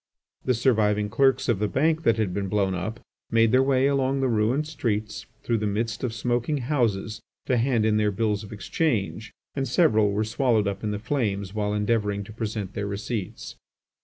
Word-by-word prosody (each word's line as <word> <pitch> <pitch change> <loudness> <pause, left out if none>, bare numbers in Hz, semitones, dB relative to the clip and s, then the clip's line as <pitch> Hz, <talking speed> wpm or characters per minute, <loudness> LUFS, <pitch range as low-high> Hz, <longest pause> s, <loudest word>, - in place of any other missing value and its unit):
The 125 - +2
surviving 105 -4 +2
clerks 135 +4 +2
of 115 -6 +1
the 105 - +1
Bank 155 +8 +1
that 115 -6 +2
had 105 -5 0
been 100 0 -2
blown 95 -1 +1
up, 110 +6 -4 0.3
made 115 -1 +4
their 130 +1 +5
way 135 -1 +3
along 135 -1 +1
the 135 - +1
ruined 120 +6 +1
streets 110 -8 -3 0.2
through 115 -2 0
the 105 - -1
midst 110 +4 -2
of 125 - 0
smoking 120 +6 -1
houses 115 -6 -1 0.2
to 130 - +1
hand 120 -2 +2
in 110 -1 +3
their 105 -1 +2
bills 105 +1 -1
of 105 - -11
exchange, 110 - -2 0.2
and 135 -1 -2
several 110 - +3
were 105 +2 0
swallowed 110 -1 +1
up 100 +1 -4
in 105 - -1
the 105 - -2
flames 100 -5 -2
while 105 -1 -1
endeavouring 105 -1 0
to 110 - -11
present 105 -3 -4
their 100 -2 -3
receipts. 100 0 -5
110 Hz, 190 wpm, -25 LUFS, 105-125 Hz, 0.3 s, their